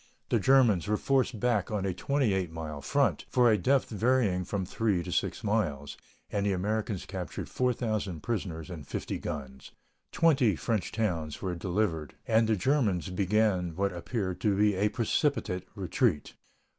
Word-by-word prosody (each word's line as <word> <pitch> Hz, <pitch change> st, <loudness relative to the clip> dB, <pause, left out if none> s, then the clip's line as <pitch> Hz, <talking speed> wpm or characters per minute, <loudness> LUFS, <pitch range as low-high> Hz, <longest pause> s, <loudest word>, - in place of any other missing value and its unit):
The -, -, +3 dB
Germans 120 Hz, -9 st, +4 dB
were 105 Hz, 0 st, +1 dB
forced 130 Hz, -3 st, +1 dB
back 115 Hz, -4 st, +1 dB
on 105 Hz, -3 st, -2 dB
a 95 Hz, -, 0 dB
28 100 Hz, -, 0 dB
mile 80 Hz, -3 st, -6 dB
front, -, -, +1 dB
for 120 Hz, -2 st, +4 dB
a -, -, +5 dB
depth 135 Hz, +8 st, +2 dB
varying 110 Hz, -4 st, +2 dB
from 95 Hz, 0 st, -2 dB
3 100 Hz, -2 st, 0 dB
to -, -, -6 dB
6 -, -, -1 dB
miles, 80 Hz, -10 st, -1 dB, 0.4 s
and 100 Hz, -, 0 dB
the 100 Hz, -1 st, +1 dB
Americans 105 Hz, +1 st, -2 dB
captured -, -, -5 dB
4,000 110 Hz, -9 st, -1 dB
prisoners 90 Hz, -7 st, -3 dB
and 75 Hz, -6 st, -8 dB
50 -, -, -4 dB
guns. 65 Hz, -3 st, -7 dB, 0.4 s
Twenty 135 Hz, -, +3 dB
French 100 Hz, +8 st, -2 dB
towns 85 Hz, -9 st, -2 dB
were 95 Hz, -2 st, -1 dB
delivered, 85 Hz, -4 st, -2 dB
and 110 Hz, 0 st, +3 dB
the 110 Hz, -, +3 dB
Germans 100 Hz, -, +1 dB
began 95 Hz, -2 st, +1 dB
what 100 Hz, +1 st, 0 dB
appeared 95 Hz, +1 st, -3 dB
to 100 Hz, -3 st, +2 dB
be 105 Hz, 0 st, +4 dB
a 100 Hz, +3 st, +1 dB
precipitate 115 Hz, -, 0 dB
retreat. 95 Hz, -, 0 dB
100 Hz, 155 wpm, -29 LUFS, 90-115 Hz, 0.4 s, a